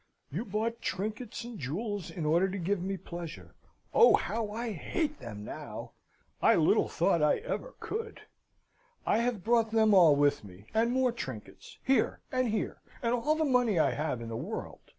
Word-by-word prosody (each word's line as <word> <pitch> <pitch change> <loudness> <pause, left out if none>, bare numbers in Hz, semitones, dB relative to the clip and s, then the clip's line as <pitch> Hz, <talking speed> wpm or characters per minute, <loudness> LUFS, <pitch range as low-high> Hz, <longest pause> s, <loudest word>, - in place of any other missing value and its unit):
"You 185 - -3
bought 225 +3 -2
trinkets 215 +5 -3
and 235 -2 -8
jewels 195 - -3
in 165 -4 -5
order 170 +5 +3
to 195 - -4
give 190 +1 -1
me 195 +1 -2
pleasure. 170 -3 -8 0.4
Oh, 465 - +8
how 225 -2 -2
I 230 +2 -3
hate 300 - -2
them 105 -2 -8
now! - - -7 0.5
I - - +6
little - - +4
thought 170 - +2
I 150 - +4
ever - - -5
could! 450 +1 -5 0.8
I 210 - +3
have 235 -5 -1
brought 230 0 +3
them 220 -1 +4
all 170 -6 +7
with 145 -1 +2
me, 95 0 -13
and 230 +2 +2
more 255 0 +2
trinkets 235 - -8
here! 265 0 +2
and 255 -1 +1
here! 215 -1 -2 0.2
and 235 0 +2
all 270 +6 +2
the 315 0 +1
money 245 - +3
I 150 -4 +4
have 145 -3 -2
in 115 - -6
the 115 - -4
world!" - - -5
210 Hz, 180 wpm, -30 LUFS, 165-240 Hz, 0.8 s, Oh